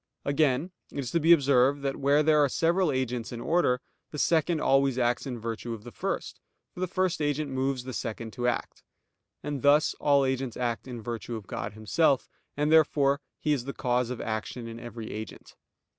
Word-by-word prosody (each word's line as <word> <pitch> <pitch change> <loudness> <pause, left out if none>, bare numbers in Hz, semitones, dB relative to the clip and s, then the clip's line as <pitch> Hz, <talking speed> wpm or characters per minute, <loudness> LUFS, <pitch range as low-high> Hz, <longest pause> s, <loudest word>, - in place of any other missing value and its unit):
Again 140 +3 +1 0.2
it - - -9
is 130 -3 -3
to 170 - +2
be 165 +2 +4
observed 140 -2 +4
that 135 -1 -1
where 140 +2 +3
there 150 -1 +5
are 140 - +2
several 170 +3 +2
agents 125 -3 -2
in 120 - -6
order, 125 -3 +2 0.3
the 150 - -7
second 160 +1 +2
always 135 -2 +3
acts 120 +2 +1
in 125 -2 -4
virtue 115 +1 -4
of 105 - -13
the 120 - -9
first; - - -4 0.3
for - - -11
the 185 - 0
first 185 -1 0
agent 145 -1 -1
moves 130 -1 -1
the 130 0 -6
second 115 -2 -5
to 125 -1 -1
act. 120 - -2 0.6
And 145 -3 -3
thus 145 +2 +4
all 140 -2 +4
agents 130 -2 -2
act 120 0 -2
in 120 -3 -7
virtue 120 0 -5
of 110 -3 -7
God 105 - -5
Himself: 125 +6 +1 0.3
and 150 +1 +1
therefore 145 -3 +4 0.2
He 150 - +1
is 130 -4 -2
the 140 - -4
cause 125 -2 0
of 125 - -4
action 115 +2 -4
in 115 0 -8
every 120 -2 -7
agent. 110 +1 -8
135 Hz, 200 wpm, -28 LUFS, 120-150 Hz, 0.6 s, there